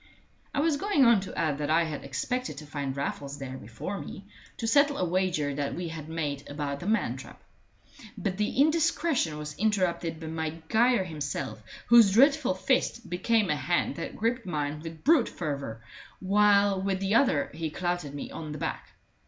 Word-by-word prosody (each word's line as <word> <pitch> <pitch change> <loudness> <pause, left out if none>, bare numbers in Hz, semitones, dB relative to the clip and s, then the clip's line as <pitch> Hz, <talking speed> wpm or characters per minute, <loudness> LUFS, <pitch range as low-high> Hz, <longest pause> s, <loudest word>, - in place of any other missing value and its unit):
I 280 - 0
was 310 -2 +2
going 325 -6 +3
on 235 -3 +6
to 190 - -8
add 150 -2 0
that 145 0 -2
I 165 +2 +4
had 155 -3 -5
expected 250 - -3
to 155 - -8
find 140 -2 -4
Raffles 140 0 -4
there 135 -2 -6
before 120 - -6
me, 195 - -8 0.3
to - - -3
settle 285 +5 +4
a 185 - +1
wager 175 -5 0
that 140 0 -2
we 175 -1 -4
had 160 -1 -7
made 145 -4 -3
about 145 -1 -3
the 175 - -6
man 225 +2 +1
trap. - - -11 0.8
But 190 -3 -2
the 210 +4 -1
indiscretion 305 - +2
was 150 0 -6
interrupted 180 -6 0
by 165 - -7
Maguire 165 +9 +1
himself, 150 -9 -4 0.2
whose 230 -4 +7
dreadful 275 -2 +4
fist 240 0 0
became 210 +2 +2
a - - +2
hand 150 +5 0
that 165 - -5
gripped 230 0 -1
mine 150 -2 -2
with 165 -1 -9
brute 300 -5 +4
fervor, 140 -8 -5 0.4
while 200 0 +4
with 195 -1 -1
the 195 +1 0
other 230 - +3
he 160 0 -3
clouted 175 -3 -3
me 145 - -6
on 155 -2 -6
the - - -6
back. - - -5
175 Hz, 180 wpm, -28 LUFS, 150-225 Hz, 0.8 s, whose